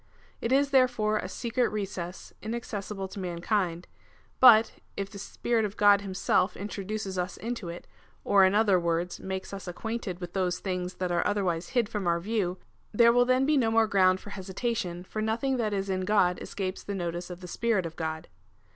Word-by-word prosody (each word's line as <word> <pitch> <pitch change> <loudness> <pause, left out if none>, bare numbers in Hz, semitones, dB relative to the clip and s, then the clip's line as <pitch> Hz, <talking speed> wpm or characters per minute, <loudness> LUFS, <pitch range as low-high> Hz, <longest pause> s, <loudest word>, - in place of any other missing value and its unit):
It 230 - -1
is, 280 +1 +3
therefore, 235 -5 +3
a 185 - -4
secret 235 +5 0
recess, 190 -4 -5
inaccessible 210 -3 -4
to 200 - -8
mankind; 175 0 -1 0.5
but, 230 -3 +7 0.2
if 200 0 -3
the 200 - -9
Spirit 230 +3 -1
of 210 0 -4
God 205 -1 +6
himself 190 -1 0
introduces 200 -1 -4
us 180 0 -3
into 230 -6 -4
it, 170 +1 -8 0.4
or 200 -1 +5
in 190 +1 +4
other 205 -4 +4
words, 170 +1 -1
makes 190 +1 -5
us 195 -1 -7
acquainted 200 0 -4
with 175 -1 -7
those 180 -2 0
things 180 -1 -3
that 180 -1 -2
are 175 - +2
otherwise 185 -5 -1
hid 235 -3 +3
from 210 -4 -3
our 170 0 +2
view, 190 -2 -1 0.3
there 235 +2 +5
will 245 0 +5
then 255 +1 +3
be 300 +1 +3
no 235 -4 +3
more 225 0 +4
ground 190 -3 +3
for 205 - -11
hesitation, 190 -2 -3
for 215 +3 -5
nothing 235 +5 0
that 220 -3 0
is 195 -1 -2
in 190 -1 -1
God 185 -2 +2
escapes 190 -1 -4
the 200 - -5
notice 175 -1 -4
of 180 0 -8
the 180 - -8
Spirit 210 0 0
of 165 0 -6
God. 160 -1 -4
195 Hz, 190 wpm, -28 LUFS, 180-220 Hz, 0.5 s, but